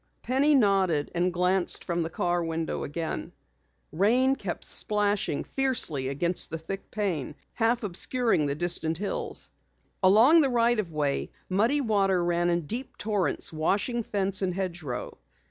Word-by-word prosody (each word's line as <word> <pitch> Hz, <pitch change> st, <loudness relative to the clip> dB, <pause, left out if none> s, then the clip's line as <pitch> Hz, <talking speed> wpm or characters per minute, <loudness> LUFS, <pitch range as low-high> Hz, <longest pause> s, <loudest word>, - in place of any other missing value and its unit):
Penny 280 Hz, +4 st, +2 dB
nodded 190 Hz, -, +2 dB
and 175 Hz, +1 st, 0 dB
glanced 180 Hz, +1 st, +2 dB
from 170 Hz, -1 st, -2 dB
the 165 Hz, -, -2 dB
car 175 Hz, +1 st, -1 dB
window 165 Hz, 0 st, -3 dB
again. 160 Hz, +2 st, -5 dB, 0.6 s
Rain 240 Hz, -, +2 dB
kept -, -, -6 dB
splashing 205 Hz, -7 st, +3 dB
fiercely 240 Hz, -, -1 dB
against 170 Hz, +6 st, 0 dB
the 165 Hz, -, -4 dB
thick 195 Hz, +5 st, -7 dB
pane, 175 Hz, -10 st, -3 dB, 0.2 s
half 235 Hz, +1 st, 0 dB
obscuring 210 Hz, -, +1 dB
the 140 Hz, -, -2 dB
distant 165 Hz, -1 st, -1 dB
hills. 200 Hz, +2 st, -4 dB, 0.5 s
Along 225 Hz, -, +6 dB
the 275 Hz, -, +2 dB
right 240 Hz, -1 st, +2 dB
of 185 Hz, -6 st, -3 dB
way, 145 Hz, -2 st, -1 dB, 0.2 s
muddy 225 Hz, +10 st, +2 dB
water 195 Hz, -6 st, +1 dB
ran 175 Hz, 0 st, +1 dB
in 170 Hz, 0 st, +1 dB
deep 245 Hz, -, -5 dB
torrents, 205 Hz, -6 st, 0 dB
washing 200 Hz, +10 st, 0 dB
fence 195 Hz, -3 st, -1 dB
and 180 Hz, -2 st, -1 dB
hedgerow. 170 Hz, -9 st, -5 dB
190 Hz, 145 wpm, -27 LUFS, 165-225 Hz, 0.6 s, Along